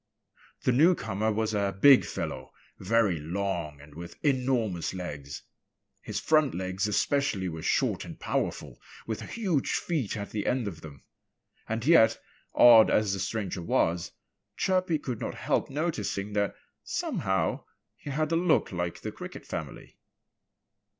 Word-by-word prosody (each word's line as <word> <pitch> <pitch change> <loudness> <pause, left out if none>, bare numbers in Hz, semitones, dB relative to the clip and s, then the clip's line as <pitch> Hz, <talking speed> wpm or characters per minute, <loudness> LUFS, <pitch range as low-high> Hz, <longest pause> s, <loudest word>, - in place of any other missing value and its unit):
The - - +3
newcomer 115 - +2
was 110 0 -1
a 100 -1 -1
big 140 +3 +7
fellow, 65 0 -5 0.3
very 100 -3 +2
long 85 -2 -3
and 75 +1 -15
with 85 +2 -9
enormous 125 - 0
legs. 70 -6 -6 0.6
His - - -4
front 155 -4 +2
legs 95 +2 -2
especially 105 -2 0
were 80 -2 -5
short - - 0
and - - -10
powerful, - - -3 0.2
with 110 -2 -4
huge 185 - -1
feet 140 - -1
at 100 -1 -6
the 105 -2 -3
end 125 -3 0
of 80 -5 -7
them. 70 -4 -12 0.7
And 115 +1 -2
yet, 115 -9 +5 0.4
odd 115 -2 +8
as 105 -2 +2
the 95 - -3
stranger 100 -2 -3
was, 85 0 0 0.5
Chirpy 185 -3 +1
could 125 -6 -5
not - - -4
help - - -1
noticing 115 - -2
that 100 -1 0 0.3
somehow 95 -4 -1 0.3
he - - -9
had 155 +3 -1
a - - +3
look 170 -1 +2
like 90 -1 -3
the - - -4
Cricket - - -9
family. - - -7
105 Hz, 145 wpm, -28 LUFS, 90-135 Hz, 0.7 s, odd